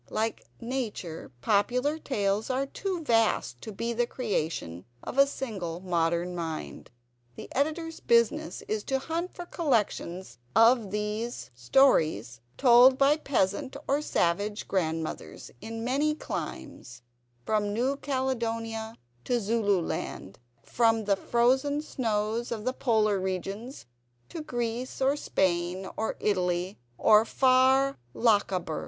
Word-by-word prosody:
Like 220 +1 -2
nature, 230 - -4
popular 250 - +1
tales 210 -6 -1
are 260 +1 0
too 360 +4 -4
vast 225 - +1
to 220 - -7
be 230 +4 -3
the 240 +1 0
creation 160 - -3 0.2
of 270 - -3
a 275 - +7
single 195 -12 -5
modern 170 -1 0
mind. 165 -2 -5 0.5
The - - -10
Editor's 315 +4 -1
business 235 -6 +1
is 215 -1 -2
to 270 - 0
hunt 330 +6 -4
for 350 - -7
collections 195 - -1 0.2
of 230 -2 +5
these 210 - -3
stories 120 - +2 0.2
told 255 0 +7
by 275 +2 +5
peasant 260 -3 -1
or 280 +2 +2
savage 205 - 0
grandmothers 160 - -3
in 225 0 -6
many 285 +5 +1
climes, 125 - -7 0.4
from 210 -1 0
New 250 +6 0
Caledonia 230 -5 -2 0.3
to 245 -1 +1
Zululand; 200 - -1 0.2
from 225 -2 +2
the 200 -1 +3
frozen 260 +7 +2
snows 225 -5 -2
of 220 -2 -4
the 255 - 0
Polar 215 -6 +2
regions 195 +7 -4 0.4
to 330 - -6
Greece, 240 -3 -3
or 270 +1 +3
Spain, 185 -7 -1
or 220 - -2
Italy, 180 -1 0 0.2
or 215 0 +6
far 265 +2 +3 0.2
Lochaber. 200 - +1
225 Hz, 120 wpm, -28 LUFS, 190-260 Hz, 0.5 s, a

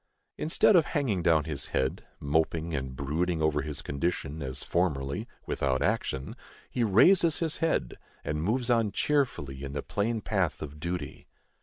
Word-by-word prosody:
Instead 165 +6 +3
of 165 -4 +6
hanging 120 -11 0
down 80 -3 +4
his 75 -2 -5
head, 65 0 -1 0.2
moping 80 +2 0
and 65 -2 -3
brooding 80 +6 -1
over 80 -1 +2
his 70 -2 -5
condition, 75 0 -2
as 65 -2 -4
formerly, 70 -6 -1 0.2
without 65 -2 0
action, 65 +1 -1 0.4
he 120 - 0
raises 160 - +5
his 160 -2 -1
head, 160 - 0 0.2
and 75 +1 -2
moves 120 +7 0
on 115 -3 +2
cheerfully, 75 - 0
in 70 0 -5
the 70 - -3
plain 110 +3 -1
path 95 -7 0
of 75 0 -8
duty. 85 +3 -5
80 Hz, 155 wpm, -29 LUFS, 70-110 Hz, 0.4 s, of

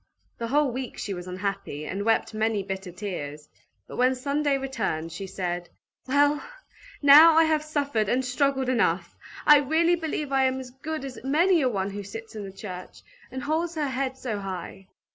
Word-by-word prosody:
The 230 - -2
whole 285 +2 +2
week 255 +1 -5
she 205 - -4
was 180 -1 -7
unhappy, 185 -5 -4
and 195 +5 -3
wept 225 +1 +1
many 215 -2 0
bitter 190 -1 -5
tears; 155 -6 -6 0.4
but - - -9
when 255 +1 +3
Sunday 280 +2 0
returned, 225 -12 -3
she 190 +4 -6
said, 175 -2 -4 0.4
"Well, 290 +2 +3 0.6
now 305 +3 +9
I 325 - +7
have 315 -1 +2
suffered 285 -9 -1
and 255 +1 +1
struggled 265 +1 +1
enough! 185 -9 +1 0.3
I 295 -1 +9
really 320 +5 +2
believe 310 -3 -3
I 270 -1 +3
am 260 0 0
as 255 -1 -8
good 290 +3 -5
as 260 -3 -8
many 330 +6 +3
a 260 - +2
one 195 -3 -2
who 205 +1 -5
sits 225 +3 -9
in 210 - -5
the 195 - -7
church, 185 -2 -9 0.3
and 260 +1 -6
holds 325 +3 -1
her 300 -3 -1
head 265 0 -2
so 225 -6 -3
high!" 190 0 -7
255 Hz, 185 wpm, -26 LUFS, 195-285 Hz, 0.6 s, now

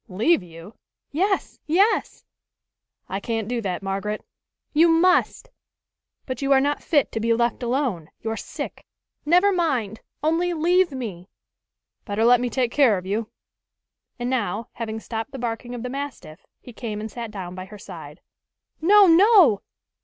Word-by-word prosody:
"Leave 220 - +2
you?" 170 +3 -12 0.4
"Yes! 385 +6 -1
yes!" 390 +8 +1 0.8
"I 195 - -3
can't 225 0 -3
do 240 0 -2
that, 190 -3 -3
Margaret." 195 +2 -3 0.5
"You 325 +3 +5
must!" 360 +8 +2 0.8
"But 255 -1 -5
you 275 0 0
are 265 - +6
not 290 +2 0
fit 290 -5 +1
to 225 - -3
be 230 +1 +2
left 235 +1 0
alone. 240 - -1
You're 225 0 -3
sick." - - -7 0.4
"Never 360 +5 +5
mind 260 - -1 0.2
only 335 +3 +1
leave 350 +2 +3
me!" 205 -9 -6 0.7
"Better 215 +1 0
let 245 0 +5
me 245 - -1
take 245 0 0
care 250 -8 +4
of 180 - -7
you." 215 +3 -2 0.9
And 240 -1 -3
now, 230 -4 -2
having 220 -1 -5
stopped 225 +4 -5
the - - -5
barking 240 0 -4
of 240 - -6
the - - -3
mastiff, 270 - -7
he 245 - -13
came 220 -3 -5
and 220 0 -6
sat 235 -2 -6
down 190 -4 -7
by 185 0 -7
her 210 +2 -12
side. 205 - -11 0.6
"No! 405 +5 +7
no!" 355 - +6
240 Hz, 160 wpm, -23 LUFS, 210-310 Hz, 0.9 s, No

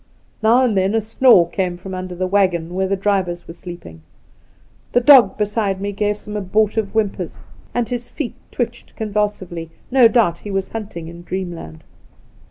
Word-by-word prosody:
Now 235 +4 +5
and 225 -4 +1
then 190 +2 +2
a - - +4
snore 220 -4 +5
came 180 -1 -2
from 190 +1 -8
under 185 -1 -5
the 185 +1 -1
waggon 180 -3 +1
where 190 +1 0
the 195 - +1
drivers 190 -3 -1
were 165 - -8
sleeping. 175 - -10
• - - -19 0.9
The - - +5
dog 260 0 +7
beside 210 -2 0
me 200 +1 -3
gave 205 +1 -1
some 210 0 -8
abortive 210 +1 +1
whimpers, 195 -6 -1 0.3
and 240 -2 -1
his 245 -1 -4
feet 290 -6 -4 0.2
twitched 235 -1 -4
convulsively 205 -6 -2
— - - -33
no 255 -2 +7
doubt 220 -8 +2
he 210 - -8
was 195 -1 -2
hunting 200 -7 -6
in 170 +1 -10
dreamland. 175 - -6
200 Hz, 175 wpm, -20 LUFS, 180-220 Hz, 0.9 s, dog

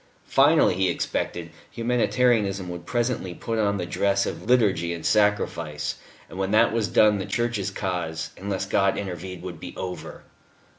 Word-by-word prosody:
Finally, 145 - +4
he 95 0 +1
expected, 85 -1 -3 0.2
Humanitarianism 115 -5 +1
would 85 -1 -7
presently 120 -7 -1
put 115 -1 -3
on 100 -1 +1
the 90 - -3
dress 100 +3 +1
of - - -4
liturgy 95 -9 +3
and 85 - -8
sacrifice, 85 -8 +1 0.3
and 95 - -9
when 95 0 0
that 110 +2 +4
was 115 -2 +1
done, 105 -2 +4
the 95 - -3
Church's 110 -2 -1
cause, 85 -5 -3
unless 95 -1 -3
God 95 -1 +2
intervened, 90 -2 -6
would 90 -3 -7
be 90 - -9
over. 90 -1 -6
95 Hz, 155 wpm, -25 LUFS, 90-110 Hz, 0.3 s, Finally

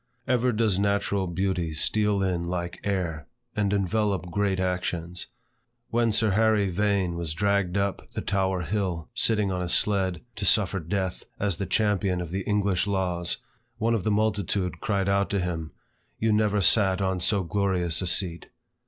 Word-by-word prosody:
Ever 125 -1 +2
does 110 -4 +1
natural 100 -1 0
beauty 85 -2 -1
steal 105 +4 +2
in 90 -2 -1
like 85 0 -4
air, 85 -6 -2 0.3
and 105 -2 +1
envelope 100 -2 0
great 100 0 0
actions. 90 -1 -2 0.6
When 115 -1 +2
Sir 110 0 +2
Harry 105 -2 +2
Vane 100 -2 0
was 80 -2 -3
dragged 100 0 +1
up 100 -1 -2
the - - -2
Tower 95 -2 0
hill, 90 -2 -2
sitting 105 -3 +2
on 90 -1 -2
a 90 - -2
sled, 95 -2 +2 0.2
to - - -4
suffer 95 -3 +3
death, 95 +2 -3
as 100 -4 0
the 100 - -3
champion 100 -4 +1
of 85 -2 -5
the 95 +2 -2
English 100 -2 +1
laws, 90 -3 -1 0.4
one 115 +2 +1
of 110 -5 0
the 110 - 0
multitude 100 -4 0
cried 100 -2 0
out 100 0 +2
to 100 - 0
him, 85 -3 -3 0.5
"You 110 -1 +1
never 105 -1 +2
sate 95 -1 +4
on 95 -1 0
so 95 +2 +1
glorious 90 -3 +1
a 90 - -2
seat." 85 -2 +1
95 Hz, 165 wpm, -26 LUFS, 90-105 Hz, 0.6 s, sate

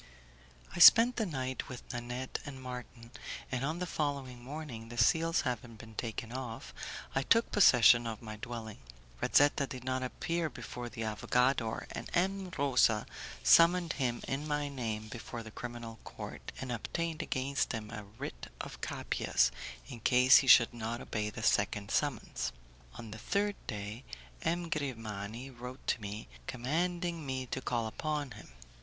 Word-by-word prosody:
I - - -4
spent 235 +6 +9
the 220 -3 +1
night 130 -5 -3
with 125 0 -7
Nanette 120 +2 -4
and 140 -3 -8
Marton, 125 -2 -8 0.4
and 125 0 -1
on 155 +4 -1
the 180 - -2
following 140 -7 -3
morning, 130 -5 -7
the 120 - -8
seals 165 +7 +4
having 120 -3 -3
been 110 0 -12
taken 115 0 -4
off, 125 -3 -6 0.4
I 135 - +2
took 230 +11 +3
possession 120 - +7
of 110 -2 -4
my 110 -2 -7
dwelling. 110 -1 -6 0.4
Razetta 145 -1 +4
did 125 -1 -7
not 130 0 -1
appear 165 +6 -1
before 120 -4 -7
the 115 - -5
'avogador', 115 +2 +1
and - - -6
M. 190 +1 +1
Rosa 125 -6 +3 0.4
summoned 170 0 +6
him 120 -3 -1
in 140 +3 -2
my 145 -1 0
name 110 -5 -3
before 115 +1 -7
the 110 - -10
criminal 120 -1 -7
court, - - -8
and 130 -2 -4
obtained 160 +7 -2
against 135 -2 -1
him 110 -1 -5
a 105 -2 -6
writ - - -6
of - - -7
'capias' - - +1 0.4
in 120 - -8
case 125 +3 +7
he 135 - +2
should 120 -2 +8
not 115 0 -3
obey 105 -1 -2
the 105 - -7
second 100 -1 +1
summons. 145 -7 -1 0.4
On 115 -2 -8
the 110 - -7
third 205 - 0
day 105 +2 -5 0.4
M. 170 +1 0
Grimani 115 -5 -4
wrote 125 +1 -9
to 115 - 0
me, 105 +1 -6 0.2
commanding 170 +6 -1
me 130 -2 -3
to 130 - -4
call 120 -2 -1
upon 145 +4 -2
him. 110 0 -11
125 Hz, 160 wpm, -33 LUFS, 115-145 Hz, 0.4 s, spent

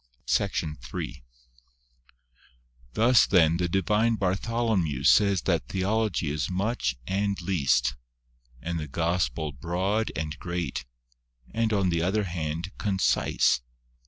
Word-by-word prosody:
f - - -13
SECTION 75 -2 0
III. - - -5 1.7
Thus, 120 +2 +5
then, 85 -3 +4
the 90 0 -1
divine 105 +5 +2
Bartholomew 95 - 0
says 100 +3 +4
that - - 0
Theo 95 +3 -1
logy 90 -9 -1
is 75 -1 -2
much 95 - -1
and 100 +3 -1
least, 70 -10 +1 0.7
and 85 -1 -2
the 75 - -5
Gospel 80 -2 -1
broad 90 - -1
and 75 0 -4
great, 85 -8 -3 0.7
and 115 -1 +1
on 100 -3 +2
the 85 -1 0
other 100 +5 +1
hand 85 0 -4
concise. 95 -9 +2
90 Hz, 120 wpm, -27 LUFS, 80-100 Hz, 1.7 s, Thus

